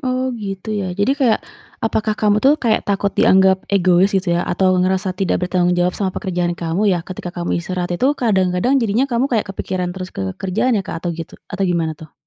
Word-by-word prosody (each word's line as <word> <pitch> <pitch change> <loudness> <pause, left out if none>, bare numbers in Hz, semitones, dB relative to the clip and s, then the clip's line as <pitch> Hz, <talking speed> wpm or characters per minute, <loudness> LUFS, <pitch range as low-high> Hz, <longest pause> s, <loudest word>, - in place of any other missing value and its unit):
Oh 255 -1 -1
gitu 205 -2 -5
ya. 200 -3 -2
Jadi 205 +7 +2
kayak, 240 -5 +2 0.4
apakah 215 -1 0
kamu 210 0 +2
tuh 275 +2 +5
kayak 235 -7 0
takut 200 0 0
dianggap 190 0 +4
egois 185 -1 +4
gitu 185 -2 0
ya 170 - +1
atau 185 +1 +2
ngerasa 185 +1 0
tidak 185 -1 -1
bertanggung 180 0 +1
jawab 175 0 +2
sama 190 -3 -1
pekerjaan 175 -3 -1
kamu 175 +5 0
ya - - -1
ketika 180 -1 -7
kamu 175 -1 -1
istirahat 180 0 -4
itu 250 +9 +1
kadang-kadang 195 +3 +2
jadinya 230 +4 +1
kamu 240 +3 +1
kayak 225 -4 0
kepikiran 185 -2 -3
terus 185 0 -6
ke 95 -1 -3
kerjaan 205 +5 0
ya - - -2
Kak 165 - -5
atau 175 - 0
gitu 165 -1 -8 0.2
atau 195 +1 -1
gimana 165 -3 0
tuh? 155 -1 -13
190 Hz, 205 wpm, -19 LUFS, 180-215 Hz, 0.4 s, tuh